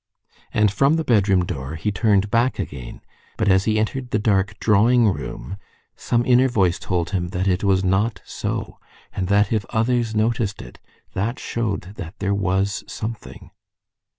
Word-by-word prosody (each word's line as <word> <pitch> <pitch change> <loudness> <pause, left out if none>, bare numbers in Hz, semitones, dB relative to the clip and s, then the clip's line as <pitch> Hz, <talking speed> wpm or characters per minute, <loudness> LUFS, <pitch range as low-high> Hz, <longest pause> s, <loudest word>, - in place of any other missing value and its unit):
And 105 -1 +3
from 140 +8 +3
the 160 - 0
bedroom 100 - +3
door 70 -3 -5
he 85 +6 -2
turned 100 0 +2
back 120 +3 +2
again; 65 -4 -6 0.4
but 110 - 0
as 95 0 +4
he 110 -1 +1
entered 125 +4 -2
the - - +1
dark 100 -1 +1
drawing 115 +3 +4
room 70 -1 -4 0.4
some 120 0 0
inner 130 +1 +5
voice 95 -8 +1
told 90 -2 -2
him 90 -3 -1
that 95 +1 -2
it 95 +1 +1
was 95 -1 +2
not 95 +5 +1
so, - - -4 0.3
and 95 - -2
that 100 +2 +3
if 110 -2 +1
others 115 0 0
noticed 110 -2 0
it - - -11 0.3
that 115 +6 -2
showed 100 -5 -3
that 95 -1 -8
there 100 0 -1
was 100 +1 0
something. 110 0 -7
100 Hz, 165 wpm, -22 LUFS, 95-115 Hz, 0.4 s, inner